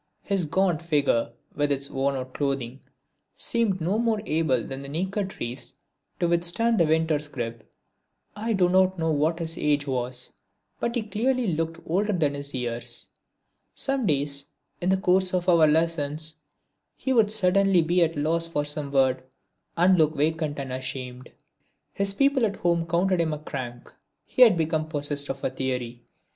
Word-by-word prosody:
His 195 -4 0
gaunt 175 0 +1
figure 145 -8 +1 0.2
with 145 0 0
its 140 0 -1
worn 135 +1 -1
out 130 -1 -6
clothing 135 -3 -2 0.6
seemed 225 -5 0
no 185 +7 0
more 230 -2 +1
able 155 - +1
than 135 0 -6
the 140 - -8
naked 190 +6 -2
trees 120 -9 -6 0.4
to 175 - +2
withstand 175 +7 +2
the 165 - +4
winter's 160 -1 +1
grip. 115 -4 -6 0.6
I 220 +2 -2
do 185 -3 +3
not 185 +1 +3
know 160 -1 0
what 155 +3 +1
his 165 -1 -4
age 145 -1 +1
was 125 -2 -3 0.5
but 235 +1 -2
he 240 - 0
clearly 225 0 0
looked 165 +1 -2
older 205 +5 0
than 155 -6 +1
his 140 0 -6
years. 120 -2 -4 0.7
Some 270 -5 0
days 140 -2 0 0.3
in 180 - 0
the 190 - +3
course 185 0 +2
of 180 0 -1
our 170 -3 +6
lessons 155 -1 0 0.6
he 265 - -1
would 225 -4 +4
suddenly 195 -3 +4
be 175 +3 +2
at 165 0 0
a 145 - -2
loss 165 +2 0
for 145 -3 -2
some 145 -1 -4
word 130 -2 +2 0.6
and 180 +1 +4
look 155 0 +3
vacant 155 0 0
and 135 -2 -4
ashamed. 130 -1 -6 0.6
His 200 0 +1
people 275 +4 +2
at 200 - -5
home 170 -2 0
counted 175 +2 +2
him 160 -2 0
a - - -3
crank. 130 -5 -7 0.3
He - - -2
had 225 -8 +8
become 155 -1 -1
possessed 145 -2 -2
of 135 - -5
a - - 0
theory. 125 -2 -3
160 Hz, 170 wpm, -25 LUFS, 140-185 Hz, 0.7 s, had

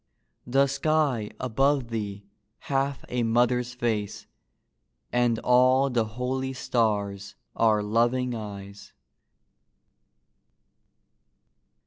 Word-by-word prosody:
The 135 +3 +4
sky 140 -5 0
above 135 +1 +1
thee 105 -3 -4 0.3
hath 135 0 -2
a 125 0 -2
mother's 120 +1 +1
face, 110 -4 -2 0.9
And 120 -2 +2
all 130 +2 +4
the 115 -2 +1
holy 130 +1 -2
stars 100 -6 -1 0.2
are 110 -2 +3
loving 120 +4 +1
eyes. 100 -2 -8
120 Hz, 80 wpm, -26 LUFS, 110-130 Hz, 0.9 s, The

